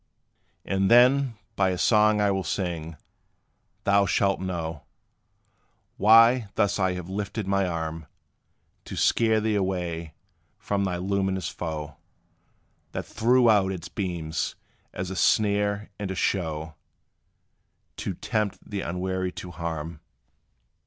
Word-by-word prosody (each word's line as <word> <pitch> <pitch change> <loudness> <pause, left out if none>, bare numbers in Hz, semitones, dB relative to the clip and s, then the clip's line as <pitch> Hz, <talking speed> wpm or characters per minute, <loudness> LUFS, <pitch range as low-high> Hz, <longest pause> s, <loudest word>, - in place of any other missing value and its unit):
And 95 0 +1
then, 125 +1 +5 0.2
by 95 -1 +2
a 90 - -1
song 105 +2 +4
I 100 -1 +3
will 95 -1 -1
sing, 85 -2 -3 0.9
thou 100 0 +3
shalt 100 +2 +2
know, 85 -4 -4 1.1
Why 115 +1 +6
thus 100 0 +1
I 95 -1 +2
have 90 -1 -6
lifted 100 +2 -4
my 100 0 +1
arm 80 -2 -4 0.8
To - - -7
scare 110 -1 +3
thee 110 0 0
away 90 -5 -2 0.4
from 100 -1 -1
thy 90 -2 -1
luminous 95 0 -1
foe. 75 -4 -5 1.0
That - - -4
threw 125 +2 +3
out 100 -4 +4
its 90 -3 -6
beams, 85 -5 -3 0.4
as 90 +1 -5
a - - -4
snare, 105 0 +1
and 100 -2 -3
a 95 - -3
show 80 -5 -1 1.2
To 95 - -4
tempt 105 +1 -1
the 100 -1 -4
unwary 95 +1 -2
to 90 - -8
harm. 80 -2 -5
95 Hz, 125 wpm, -26 LUFS, 85-105 Hz, 1.2 s, Why